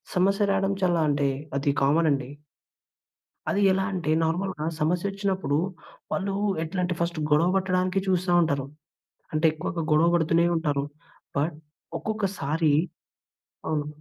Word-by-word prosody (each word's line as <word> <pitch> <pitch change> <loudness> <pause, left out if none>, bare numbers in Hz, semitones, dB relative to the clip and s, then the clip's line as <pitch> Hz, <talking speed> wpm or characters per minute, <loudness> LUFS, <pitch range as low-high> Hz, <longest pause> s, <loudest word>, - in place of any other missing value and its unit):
సమస్య 195 +2 +2
రావడం 195 0 +1
చాలా 175 -2 +3
అంటే 140 -1 +2 0.3
అది 140 0 +1
కామనండి. 140 -3 +2 1.2
అది 205 - +1
ఎలా 190 0 +1
అంటే, 165 -4 -1
నార్మల్‌గా 165 -1 -1
సమస్యొచ్చినప్పుడు 185 -1 0 0.5
వాళ్ళు 195 0 -1 0.3
ఎట్లా 180 +3 -4
అంటే 175 0 0
ఫస్టు 170 -1 -1
గొడవ 165 +4 +4
పట్టడానికి 185 0 +1
చూస్తా 185 -1 +1
ఉంటారు. 140 -4 0 0.7
అంటే 155 +1 +2
ఎక్కువగా 165 +1 -4
గొడవ 160 +3 +5
పడుతూనే 170 +1 +3
ఉంటారు. 145 -3 0 0.5
బట్ 150 +2 0 0.4
ఒక్కొక్కసారి 175 -8 0 1.0
అవును. 150 -2 -1
170 Hz, 115 wpm, -26 LUFS, 150-190 Hz, 1.2 s, గొడవ